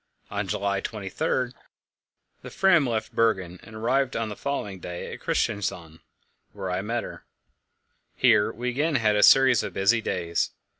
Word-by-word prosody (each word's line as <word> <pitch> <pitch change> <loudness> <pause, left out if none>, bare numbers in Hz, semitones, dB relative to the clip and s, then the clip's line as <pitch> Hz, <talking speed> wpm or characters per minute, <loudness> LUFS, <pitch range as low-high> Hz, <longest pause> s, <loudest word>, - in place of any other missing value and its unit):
On - - -2
July 100 -1 -1
23 120 +5 -2 0.9
the - - -9
Fram 175 -7 +3
left 110 -1 -3
Bergen, 95 -6 0
and 110 - -13
arrived 130 +4 0
on 115 -1 -2
the 105 - -6
following 105 -9 -4
day 90 0 -6
at - - -8
Christiansand, 85 -5 -2 0.5
where 95 -2 -5
I 90 +1 -1
met 115 +3 -2
her. - - -9 0.9
Here 105 - +4
we 125 +2 -3
again 145 +5 0
had 110 -4 +2
a 105 - +3
series 130 -2 +6
of - - -5
busy 105 +4 +2
days. 85 -5 -2
110 Hz, 155 wpm, -25 LUFS, 95-125 Hz, 0.9 s, series